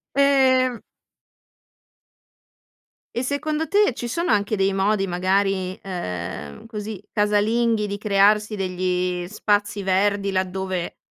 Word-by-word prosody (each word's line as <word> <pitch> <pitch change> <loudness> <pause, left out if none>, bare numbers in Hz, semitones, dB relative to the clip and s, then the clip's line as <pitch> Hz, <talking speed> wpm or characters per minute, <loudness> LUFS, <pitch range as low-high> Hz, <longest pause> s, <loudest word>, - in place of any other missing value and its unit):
Ehm 260 -3 +3 2.3
E 240 - -1
secondo 305 +4 -1
te 405 - +3
ci 240 - -5
sono 335 +5 -1
anche 210 +1 +1
dei 195 -1 +1
modi 195 +1 +1
magari, 185 +1 0
ehm, 90 - -6
così 210 -3 -6
casalinghi 210 +1 +1
di 200 - -4
crearsi 210 +1 +3
degli 180 -2 -1
spazi 205 0 0
verdi 200 +1 +1
laddove 185 -1 -2
205 Hz, 105 wpm, -23 LUFS, 190-225 Hz, 2.3 s, Ehm